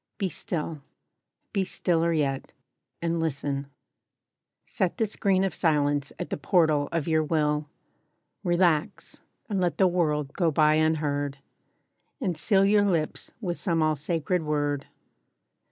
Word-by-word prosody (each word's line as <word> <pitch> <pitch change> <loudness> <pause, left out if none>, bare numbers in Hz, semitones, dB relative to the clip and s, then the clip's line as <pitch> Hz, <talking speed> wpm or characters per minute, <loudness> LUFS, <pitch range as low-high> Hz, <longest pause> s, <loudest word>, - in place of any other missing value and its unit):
BE 195 -3 -1
STILL: 160 -3 -4 0.7
Be 195 -2 +1
stiller 170 -2 +1
yet; 140 -4 -1 0.5
and 170 0 0
listen. 140 -3 -2 1.0
Set 185 -5 -1
the 225 - +2
screen 195 -2 +1
Of 195 - 0
silence 145 -4 +1
at - - -6
the - - -1
portal 150 -2 +2
of 165 -2 -1
your 160 -1 +2
will. 150 -1 0 0.8
Relax, 175 -3 0 0.3
and 200 -4 -1
let 175 -1 0
the 190 - +5
world 150 -6 0
go 175 -4 +2
by 155 0 +4
unheard. 150 -3 0 0.8
And 190 - -1
seal 190 +6 +3
your 205 +1 +4
lips 165 -6 -1
with 175 -5 -2
some 165 -5 +1
all 155 0 +2
sacred 165 +4 -1
word. 145 -2 -1
160 Hz, 135 wpm, -27 LUFS, 150-180 Hz, 1.0 s, the